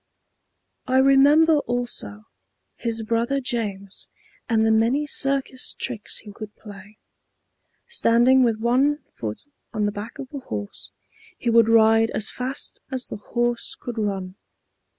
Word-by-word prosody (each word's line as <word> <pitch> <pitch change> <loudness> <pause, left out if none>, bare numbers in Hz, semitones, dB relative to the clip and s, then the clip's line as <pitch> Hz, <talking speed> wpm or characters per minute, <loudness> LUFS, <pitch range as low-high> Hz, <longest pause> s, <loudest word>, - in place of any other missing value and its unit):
I 260 0 +2
remember, 285 +4 +6
also, 240 - -3 0.5
his 230 -1 -2
brother 235 +5 0
James 210 -6 -4 0.4
and 220 -1 +3
the 220 - +3
many 235 +7 +2
circus 275 -2 -1
tricks 225 -5 -3
he 210 - -8
could 215 0 -9
play. 205 0 -13 0.9
Standing 240 +3 +4
with 230 -3 +2
one 265 +6 +2
foot 110 - -6 0.3
on 215 -2 0
the 205 - 0
back 205 +2 -7
of 270 +1 -9
a 280 - -4
horse, 105 - -7 0.5
he 235 - -1
would 230 -1 +5
ride 225 0 +5
as 215 - -1
fast 260 +2 -4
as 255 -1 -2
the - - -7
horse 240 +3 -2
could 240 -2 -5
run. 195 -3 -3
230 Hz, 135 wpm, -23 LUFS, 210-260 Hz, 0.9 s, remember